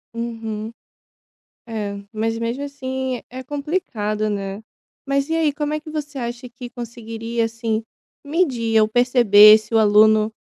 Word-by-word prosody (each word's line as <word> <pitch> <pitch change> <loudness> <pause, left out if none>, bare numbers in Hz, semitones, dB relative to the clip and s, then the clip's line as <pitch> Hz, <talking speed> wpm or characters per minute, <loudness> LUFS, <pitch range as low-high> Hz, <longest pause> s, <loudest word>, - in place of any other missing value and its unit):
Uhum. 225 -2 -5 1.0
É, 205 -3 -4
mas 225 +1 -1
mesmo 235 +4 -3
assim 260 -3 -4
é 255 +1 -8
complicado, 245 - -2
né. 200 +1 -4 0.4
Mas 275 +1 0
e 325 - -1
aí, 320 -3 +2
como 295 +1 -2
é 305 - -2
que 310 - -10
você 295 -2 -5
acha 240 0 -5
que 245 0 -10
conseguiria, 230 -1 -4
assim, 225 -1 -2 0.4
medir 260 -8 +1
ou 215 - +3
perceber 220 -3 +7
se 215 +1 -9
o - - +5
aluno 215 0 +5
230 Hz, 145 wpm, -21 LUFS, 220-265 Hz, 1.0 s, perceber